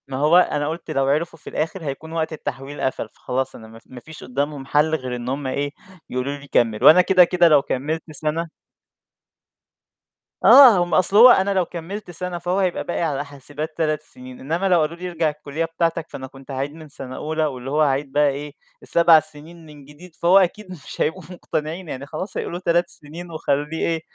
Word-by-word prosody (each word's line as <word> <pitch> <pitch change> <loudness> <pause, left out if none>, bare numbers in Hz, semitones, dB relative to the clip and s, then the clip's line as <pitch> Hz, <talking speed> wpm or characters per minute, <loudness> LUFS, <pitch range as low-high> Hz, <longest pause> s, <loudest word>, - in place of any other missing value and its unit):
ما 135 -1 -5
هو 150 +5 +4
أنا 150 -5 +2
قُلت 165 +1 -5
لو 135 -3 +1
عرفوا 155 +4 -1
في - - -9
الآخر 165 +3 -3
هيكون 150 +2 -6
وقت 160 -1 -2
التحويل 145 -1 -6
قفل، 130 -4 -2
فخلاص 130 +3 -4
أنا 110 - -12
ما 115 +1 -14
ف - - -28
ما 125 - -11
فيش 155 +5 -13
قدّامهم 140 +2 -3
حَل 150 +3 +2
غير 130 -4 -4
إن 120 0 -5
هم 135 +1 -3
إيه 140 +2 -2 0.4
يقولوا 130 +3 -3
لي 145 0 -14
كمّل، 115 -3 +1
وأنا 160 +6 +8
كده، 185 0 +5
كده 175 0 +3
لو 150 -3 +5
كمّلت 150 +4 -3
سَنة 155 +3 0 1.9
آه، 260 -7 +9
هم 175 - -5
أصل 185 +2 +3
هو 240 +3 +10
أنا 200 -3 +4
لو 185 -2 +1
كمّلت 180 +4 -7
سَنة 180 +1 -2
فهو 175 +3 -1
هيبقى 185 -3 0
باقي 175 - -3
على 145 -4 -1
حاسبات 145 +2 -8
3 155 -2 0
سِنين، 130 -4 -10
إنّما 165 +8 -1
لو 180 -2 +4
قالوا 155 +2 -2
لي 180 +1 -6
ارجع 165 -2 0
الكلّية 150 +1 -4
بتاعتك 165 0 -1
فأنا 130 - -8
كنت 135 +1 -13
عايز 135 +2 -3
من 155 0 -12
سَنة 130 -2 -8
أولى، 155 +2 -2
واللي 135 -2 -5
هو 150 +2 +1
هاعيد 140 -1 +1
بقى 145 +1 +3
إيه، 145 +1 -6 0.3
7 170 -1 +6
سِنين 155 +2 -8
من 150 -2 -14
جديد 160 +4 -15
فهو 175 +3 +4
أكيد 190 +1 +1
مش 175 -6 -9
هيبقوا 165 +4 -1
مقتنعين 170 0 -5
يعني 135 0 -6
خلاص 170 +7 -6
هيقولوا 175 - -4
3 175 -1 +1
سِنين 170 +4 -9
وخلّيه 150 0 -2
إيه، 165 -1 -1
155 Hz, 205 wpm, -21 LUFS, 140-170 Hz, 1.9 s, هو